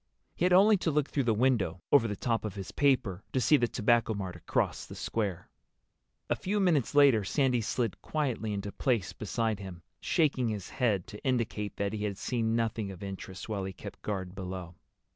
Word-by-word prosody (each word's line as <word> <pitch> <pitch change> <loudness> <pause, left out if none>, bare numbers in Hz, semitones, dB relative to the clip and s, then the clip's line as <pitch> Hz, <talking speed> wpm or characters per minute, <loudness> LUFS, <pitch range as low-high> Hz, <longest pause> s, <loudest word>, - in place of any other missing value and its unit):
He 175 - 0
had 180 - +3
only 200 +4 +7
to 175 - -1
look 150 -2 +1
through 140 -3 0
the 115 - +3
window, 110 -8 +1
over 120 -5 +6
the 105 - -3
top 115 +2 -1
of 105 -2 -4
his 95 -2 -6
paper, 115 -9 +1
to 130 - +2
see 125 +5 +5
the 120 -4 +3
Tobacco 115 -1 +2
Mart 95 -3 -4
across 85 - -1
the - - -9
square. 100 -6 -2 0.8
A - - +1
few 205 +3 -1
minutes 160 - +2
later 140 -7 +6
Sandy 125 +3 +1
slid 115 0 -2
quietly 130 -8 -2
into 100 0 -3
place 115 -6 0
beside 110 0 -1
him, 90 -3 -8 0.2
shaking 135 -7 +1
his 105 -4 -5
head 105 -8 +1
to 105 -2 -11
indicate 115 -5 -1
that 100 +1 -2
he 105 -1 -3
had 100 -2 -3
seen 115 -1 0
nothing 110 -3 -1
of 95 0 -8
interest 95 -1 -7
while 105 -3 -2
he 95 0 -4
kept - - -10
guard 95 -3 -3
below. 90 -2 -6
110 Hz, 200 wpm, -30 LUFS, 100-130 Hz, 0.8 s, only